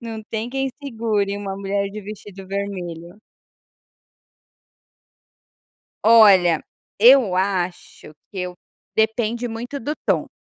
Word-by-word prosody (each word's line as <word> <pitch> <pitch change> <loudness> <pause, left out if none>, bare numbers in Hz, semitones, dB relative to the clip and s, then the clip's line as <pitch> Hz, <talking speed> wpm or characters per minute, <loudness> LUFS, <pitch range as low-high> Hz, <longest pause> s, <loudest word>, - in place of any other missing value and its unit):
Não 225 -2 -7
tem 225 +2 -3
quem 270 +1 -1
segure 220 -6 -1
uma 195 -1 -5
mulher 200 0 -2
de 215 +1 -7
vestido 200 -1 -10
vermelho. 185 -3 -5 2.9
Olha, 195 -7 +6 0.3
eu 235 -4 +6
acho 185 -4 -3 0.2
que 195 - -8
eu 180 0 -4 0.4
depende 225 +2 0
muito 240 +4 -5
do 285 +4 -3
tom. - - +1
205 Hz, 105 wpm, -21 LUFS, 190-230 Hz, 2.9 s, Olha